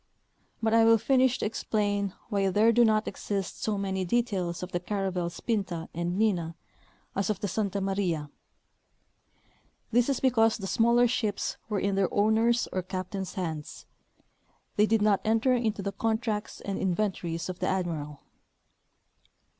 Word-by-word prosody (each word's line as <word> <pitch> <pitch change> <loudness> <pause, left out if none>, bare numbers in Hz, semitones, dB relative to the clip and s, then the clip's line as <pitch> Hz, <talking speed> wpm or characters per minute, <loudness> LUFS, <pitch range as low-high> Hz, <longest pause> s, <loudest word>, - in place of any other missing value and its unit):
But 220 0 +2
I 230 0 +6
will 225 0 +6
finish 260 +2 +3
to - - -2
explain 205 -2 -1
why 200 -3 +1
there 215 +4 +4
do 240 +1 +5
not 215 -1 +3
exist 195 -1 -4
so 215 -2 0
many 190 -1 -1
details 185 -4 -1
of 180 - -6
the 175 - -1
caravels 180 -2 -3
Pinta 190 -8 -2
and 175 +2 -2
Nina 180 -7 +1 0.6
as 195 0 0
of 210 -3 -1
the 205 - -2
Santa 200 0 -1
Maria. 180 -7 -1 1.6
This 245 +3 +3
is 275 - +1
because 225 -4 +3
tlie 195 -3 -5
smaller 235 +3 +4
ships 215 -4 -1
were 210 -2 0
in 200 +1 0
their 195 -2 +1
owners' 225 +3 +3
or 185 - 0
cap 185 0 -5
tains' 190 -2 -4
hands; 160 -5 -5 0.9
they 210 +1 +4
did 220 -1 +2
not 210 -2 +3
enter 225 +4 +2
into 225 -5 0
the 200 - -2
contracts 220 0 -2
and 200 -1 -3
inven 190 +2 +1
tories 165 -2 -4
of 185 -1 -6
the 185 - -1
admiral. 160 -6 -2
200 Hz, 160 wpm, -28 LUFS, 185-225 Hz, 1.6 s, I